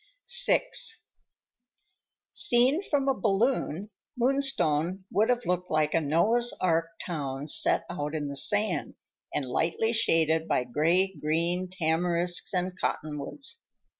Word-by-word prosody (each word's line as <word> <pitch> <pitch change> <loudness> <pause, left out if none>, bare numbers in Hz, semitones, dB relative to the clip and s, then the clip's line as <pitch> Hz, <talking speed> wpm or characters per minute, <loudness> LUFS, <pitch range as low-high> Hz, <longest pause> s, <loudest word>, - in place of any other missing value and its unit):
VI - - +3 1.7
Seen 255 +7 +3
from 290 -8 -1
a 270 - +3
balloon, 210 - -1 0.3
Moonstone 195 - +1
would 215 +5 +1
have 245 -1 0
looked 180 0 -2
like 155 -1 0
a 165 - +2
Noah's 215 +11 +1
ark 165 -2 +1 0.2
town 140 -5 -5
set 150 - +3
out 150 -3 -5
in 150 -2 -3
the 140 - -6
sand 205 +6 0 0.4
and 145 - -2
lightly 170 - -1
shaded 160 -7 +2
by - - 0
gray 170 +9 +1
green 170 +4 -2
tamarisks 175 +1 +1
and 180 -1 -2
cottonwoods. 155 - -4
175 Hz, 120 wpm, -27 LUFS, 155-220 Hz, 1.7 s, VI